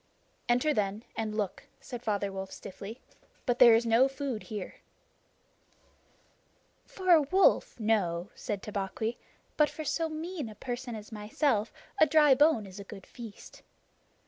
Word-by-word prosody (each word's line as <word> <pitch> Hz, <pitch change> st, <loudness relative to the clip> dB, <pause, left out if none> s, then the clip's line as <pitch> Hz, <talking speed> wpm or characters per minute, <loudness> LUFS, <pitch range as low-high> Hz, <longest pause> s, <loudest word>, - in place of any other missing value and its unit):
"Enter, 250 Hz, +6 st, +3 dB
then, 205 Hz, -1 st, -1 dB
and 215 Hz, -1 st, -3 dB
look," 205 Hz, -4 st, -3 dB
said 245 Hz, -2 st, -8 dB
Father 205 Hz, -3 st, -1 dB
Wolf 190 Hz, 0 st, -5 dB
stiffly, 205 Hz, +5 st, -9 dB, 0.5 s
"but 245 Hz, -2 st, 0 dB
there 235 Hz, -2 st, +9 dB
is 230 Hz, +1 st, +2 dB
no 230 Hz, +3 st, +5 dB
food 270 Hz, -4 st, -4 dB
here." 210 Hz, -4 st, -7 dB, 2.1 s
"For 370 Hz, -1 st, -1 dB
a 330 Hz, -3 st, +8 dB
wolf, 370 Hz, -2 st, +3 dB
no," 200 Hz, -5 st, 0 dB
said 205 Hz, -5 st, -5 dB
Tabaqui, 210 Hz, +3 st, -3 dB, 0.4 s
"but 300 Hz, -1 st, +4 dB
for 310 Hz, -, -7 dB
so 325 Hz, +3 st, 0 dB
mean 315 Hz, -4 st, -5 dB
a 215 Hz, -, -11 dB
person 245 Hz, 0 st, -5 dB
as 215 Hz, 0 st, -9 dB
myself 215 Hz, +2 st, 0 dB, 0.3 s
a 315 Hz, -, +7 dB
dry 300 Hz, -3 st, +6 dB
bone 290 Hz, -6 st, +4 dB
is 195 Hz, +1 st, -10 dB
a -, -, -6 dB
good 195 Hz, -1 st, -11 dB
feast. 230 Hz, -4 st, -11 dB
225 Hz, 145 wpm, -30 LUFS, 205-280 Hz, 2.1 s, there